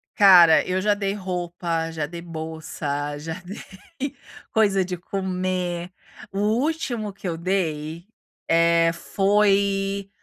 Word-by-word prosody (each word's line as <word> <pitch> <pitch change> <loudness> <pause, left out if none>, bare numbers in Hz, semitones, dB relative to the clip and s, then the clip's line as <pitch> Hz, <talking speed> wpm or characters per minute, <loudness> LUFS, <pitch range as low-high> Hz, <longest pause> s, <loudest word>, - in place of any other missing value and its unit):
Cara, 175 -5 +7
eu 185 +1 -1
já 210 +1 +3
dei 200 -1 -2
roupa, 175 -3 -3
já 155 -2 -3
dei 170 +1 -8
bolsa, 155 -3 -4
já 160 +2 -5
dei 210 - -8 0.4
coisa 200 -4 +3
de 180 -1 -4
comer. 185 -1 -3 0.4
O 195 - -4
último 235 -1 -1
que 195 - -7
eu 165 -1 -2
dei, 170 -2 -2 0.4
eh, 165 0 +4
foi 195 +1 +1
185 Hz, 115 wpm, -23 LUFS, 165-200 Hz, 0.4 s, Cara